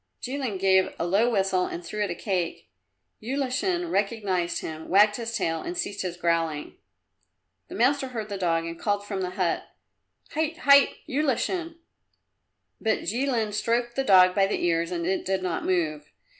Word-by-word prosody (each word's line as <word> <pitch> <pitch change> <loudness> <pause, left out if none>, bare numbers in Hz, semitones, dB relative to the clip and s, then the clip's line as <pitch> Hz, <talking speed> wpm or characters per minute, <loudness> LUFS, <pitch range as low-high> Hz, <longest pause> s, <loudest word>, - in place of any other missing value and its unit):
Jilin 255 -5 -3
gave 190 0 +3
a - - -1
low 200 +7 +3
whistle 195 -4 +1
and 170 - -6
threw 210 - -4
it 205 - -2
a 175 - -3
cake. 185 -4 -3 0.5
Ulashin 280 - -1
recognized 195 -4 0
him, 160 0 -7
wagged 210 +3 +5
his 230 -1 -4
tail 165 -5 -1
and 345 +1 -5
ceased 205 - -3
his 180 -2 -4
growling. 165 -3 -1 0.9
The - - -9
master 280 -2 +2
heard 225 -4 -5
the 205 - -5
dog 165 -2 +1
and 165 0 -6
called 205 -1 -1
from 200 -2 -3
the 180 - -2
hut, 185 -2 -1 0.6
"Hait, 315 +1 -1
hait, 280 0 +6
Ulashin!" 310 +5 -1 1.1
But 220 -1 +1
Jilin 235 -2 -1
stroked 235 +3 0
the 270 - 0
dog 185 -5 +6
by 195 0 +3
the 195 - -1
ears 165 -1 +1
and 170 -2 -3
it 190 +2 0
did 190 0 -1
not 175 -3 -2
move. 155 -5 -1
200 Hz, 170 wpm, -26 LUFS, 180-245 Hz, 1.1 s, hait